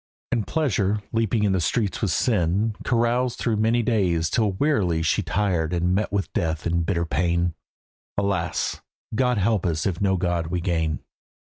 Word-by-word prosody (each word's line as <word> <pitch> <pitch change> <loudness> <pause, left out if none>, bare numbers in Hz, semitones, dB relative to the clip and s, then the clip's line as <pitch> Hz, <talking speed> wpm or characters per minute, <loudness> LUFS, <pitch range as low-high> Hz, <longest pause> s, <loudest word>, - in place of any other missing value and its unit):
And 110 -5 0
pleasure, 105 - +1
leaping 115 -1 +1
in 100 - +3
the 95 -2 +1
streets 100 +1 0
with 105 - +1
sin, 100 - +1
Caroused 120 +1 +1
through 115 -3 0
many 115 +2 +2
days 90 -8 +1
till 110 -4 +1
wearily 95 - +1
She 80 - +2
tired 90 -5 0
and 90 +1 +1
met 105 +3 0
with 100 -1 -2
death 80 -4 -1
in 85 0 +1
bitter 85 0 0
pain. 85 +1 0 0.6
"Alas! 95 -4 -1 0.3
God 125 +1 +2
help 105 0 +1
us 80 -4 -1
if 95 -2 -1
no 95 -1 +2
God 85 -2 -1
we 90 +2 -1
gain." 80 -3 -1
95 Hz, 170 wpm, -24 LUFS, 85-110 Hz, 0.6 s, in